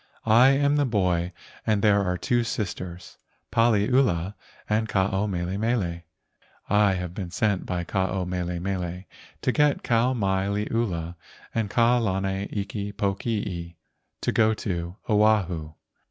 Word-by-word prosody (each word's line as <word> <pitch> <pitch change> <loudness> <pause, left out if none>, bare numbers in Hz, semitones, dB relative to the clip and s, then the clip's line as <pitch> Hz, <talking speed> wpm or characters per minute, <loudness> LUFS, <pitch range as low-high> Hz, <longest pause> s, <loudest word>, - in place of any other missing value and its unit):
I 115 +4 +6
am 140 +1 +3
the 145 - +3
boy 90 -6 +1 0.3
and 105 -2 +1
there 100 -2 +4
are 90 -1 -1
two 120 +6 +1
sisters, 90 -5 -5 0.3
Paliula 115 -4 +2 0.3
and 110 +1 0
Ke - - -8
ao 95 +2 +2
mele 90 0 -2
mele. 100 -7 0 0.7
I 105 -1 +4
have 90 -2 -4
been 90 -2 -5
sent 100 +1 0
by 90 -1 -2
Ke - - -13
ao 95 -1 0
mele 90 -1 -3
mele 90 -1 -3 0.4
to 130 - +2
get 150 +1 +2
Kau 120 +2 +2
mai 95 -3 0
liula 100 -5 -2 0.4
and 110 -3 -1
Kau 120 +2 +3
lana 95 -2 -1
iki 100 0 -4
pokii 100 -4 -2 0.5
to - - 0
go 110 -1 +3
to 85 -4 -4
Oahu." 95 -8 +2
100 Hz, 140 wpm, -25 LUFS, 90-110 Hz, 0.7 s, I